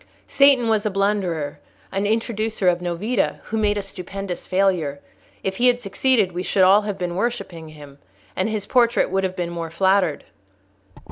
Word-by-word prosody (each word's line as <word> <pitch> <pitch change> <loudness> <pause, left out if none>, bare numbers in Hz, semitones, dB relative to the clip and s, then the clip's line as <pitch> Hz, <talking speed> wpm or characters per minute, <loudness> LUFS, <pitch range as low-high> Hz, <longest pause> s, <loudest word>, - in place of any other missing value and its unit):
"Satan 275 -4 +4
was 220 -2 +2
a 215 - 0
blunderer, 185 -7 -1 0.3
an 195 +1 -1
introducer 220 -2 -1
of 175 -1 +3
novita, 185 +6 -1
who 225 - -5
made 210 -1 +1
a 205 - -2
stupendous 195 -1 -6
failure. 180 -7 +1 0.4
If 190 0 -2
he 250 - +4
had 245 0 +3
succeeded, 215 -1 +1
we 175 +1 -4
should 190 +1 +2
all 195 +3 +6
have 205 -2 -4
been 180 -2 -3
worshipping 185 -7 -3
him, 145 -2 -13 0.4
and 190 +4 0
his 215 -2 -3
portrait 240 -6 +2
would 195 0 0
have 185 -1 -2
been 175 -2 -3
more 170 -1 -5
flattered." 190 -1 +1
195 Hz, 175 wpm, -22 LUFS, 175-215 Hz, 0.4 s, all